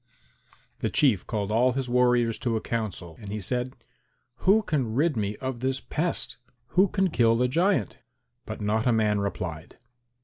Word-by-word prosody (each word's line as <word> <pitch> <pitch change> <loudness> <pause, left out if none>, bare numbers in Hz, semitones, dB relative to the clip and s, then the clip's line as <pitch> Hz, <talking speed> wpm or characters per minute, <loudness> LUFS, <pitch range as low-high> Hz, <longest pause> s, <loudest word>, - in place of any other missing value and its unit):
The - - -1
Chief 125 - +2
called 105 -2 -2
all 125 +3 +3
his 135 0 -2
warriors 125 -2 +2
to 120 -2 -1
a - - -1
council, 105 -8 -4
and 100 -3 -8
he 105 - -3
said, 125 +6 -2 0.6
"Who 210 +4 +4
can 130 - -1
rid 150 +2 +2
me 105 -1 -1
of 130 0 -4
this 130 +1 -1
pest? 170 +3 -2 0.3
Who 190 +2 +4
can 190 -1 0
kill 115 -3 +3
the 125 +1 +2
giant?" 170 - +1 0.5
But - - -6
not 110 +3 0
a - - +5
man 105 -2 +2
replied. 90 -5 -4
120 Hz, 170 wpm, -26 LUFS, 105-135 Hz, 0.6 s, a